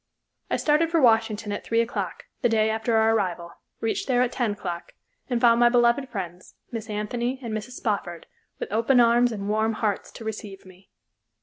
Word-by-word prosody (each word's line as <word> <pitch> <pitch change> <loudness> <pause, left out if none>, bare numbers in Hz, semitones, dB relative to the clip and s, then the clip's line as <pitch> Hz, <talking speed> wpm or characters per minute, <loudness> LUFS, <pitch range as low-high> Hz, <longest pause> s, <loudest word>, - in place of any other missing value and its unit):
I - - +1
started 305 +2 +2
for 335 0 +2
Washington 225 -4 +2
at 205 - -4
three 230 - 0
o'clock, 230 +1 -2 0.2
the 240 - +3
day 220 -1 +2
after 225 +1 0
our 220 0 +4
arrival, 175 -5 -1 0.3
reached 225 - -1
there 250 -2 +3
at 250 - -1
ten 235 -5 0
o'clock, 175 -4 -6 0.4
and 245 -2 +1
found 235 -1 +5
my 240 0 +6
beloved 240 +2 +3
friends, 180 -4 -7 0.2
Miss 225 -2 -6
Anthony 235 +5 -2
and 230 -2 -4
Mrs. 215 +3 -5
Spofford, 200 -8 -3 0.3
with - - -5
open 230 +4 +3
arms 240 +1 +4
and 200 -3 -5
warm 220 +2 +1
hearts 215 -2 -2
to 225 - -10
receive 205 -3 -6
me. 185 +1 -17
225 Hz, 190 wpm, -25 LUFS, 205-240 Hz, 0.4 s, my